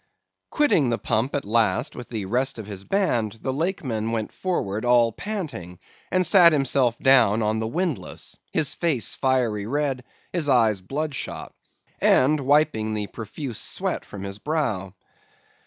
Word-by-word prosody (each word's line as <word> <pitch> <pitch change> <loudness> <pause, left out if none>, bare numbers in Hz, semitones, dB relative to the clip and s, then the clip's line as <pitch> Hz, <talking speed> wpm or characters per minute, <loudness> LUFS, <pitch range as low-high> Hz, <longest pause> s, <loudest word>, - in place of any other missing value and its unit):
"Quitting 230 - +3
the 115 - 0
pump 115 +5 -1
at 145 - -2
last, 120 +6 +1
with 125 - -8
the 110 -4 -4
rest 125 +6 -1
of 110 - -7
his 100 -2 -7
band, 120 - 0
the 130 - -1
Lakeman 135 - -2
went 110 -2 -2
forward 110 - -2
all 120 -1 +4
panting, 135 - -6 0.3
and 185 0 +2
sat 175 -4 +7
himself 135 -5 +2
down 115 -5 +4
on 110 +1 0
the 110 - -2
windlass; 165 +3 -3 0.2
his 155 -4 +1
face 145 - -1
fiery 120 -6 0
red, 135 -1 -1 0.3
his 165 -5 0
eyes 110 -7 +3
bloodshot, 145 +7 -4 0.5
and 150 +4 +4
wiping 140 -6 +2
the 105 -1 -2
profuse 115 +3 -6
sweat - - -2
from 100 -2 -9
his 100 +1 -6
brow. 120 - -2
125 Hz, 150 wpm, -24 LUFS, 110-150 Hz, 0.5 s, sat